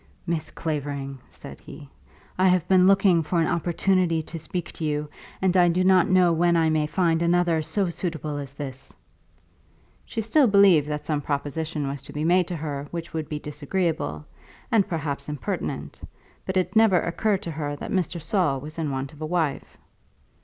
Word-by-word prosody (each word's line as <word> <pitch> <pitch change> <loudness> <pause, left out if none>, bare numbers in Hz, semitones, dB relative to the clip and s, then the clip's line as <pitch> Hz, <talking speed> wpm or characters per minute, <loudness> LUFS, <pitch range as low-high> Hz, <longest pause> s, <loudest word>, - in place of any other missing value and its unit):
"Miss 170 -3 -2
Clavering," 140 -3 -4
said - - -11
he, 145 - -12 0.5
"I 185 +1 +3
have 180 -2 +2
been 185 -1 +5
looking 195 -3 +5
for 170 +2 -1
an 165 - +3
opportunity 175 0 +1
to 165 +1 -7
speak 165 +2 -4
to - - -7
you, 150 -1 -1 0.4
and 190 -1 +2
I 180 -1 +6
do 180 +2 +1
not 185 -2 +4
know 180 -2 +4
when 170 +1 +3
I 160 -1 +3
may 155 -1 +1
find 165 0 +1
another 170 -1 +2
so 180 +5 -1
suitable 160 -3 -4
as 140 -1 -7
this." 135 -2 -7 1.1
She 230 - -6
still 235 +6 +3
believed 195 -8 +5
that 150 0 -4
some 150 -2 -1
proposition 145 +1 -3
was 140 0 -4
to - - -11
be 150 +1 -2
made 180 +1 +3
to 180 - -4
her 145 -2 -4
which 170 -1 -6
would 160 -2 -4
be 150 - -3
disagreeable, 150 - -2 0.5
and 215 -4 +3
perhaps 145 -4 -3
impertinent, 105 - -4 0.5
but 190 - -1
it 185 +4 0
never 220 -5 +5
occurred 195 +4 -1
to 170 - -4
her 145 -1 -3
that - - -7
Mr. 180 -2 -1
Saul 160 -4 0
was 155 +4 -8
in 155 -2 -1
want 135 +1 -4
of 150 - -15
a 155 - -2
wife. 160 -4 -2
165 Hz, 185 wpm, -25 LUFS, 150-180 Hz, 1.1 s, I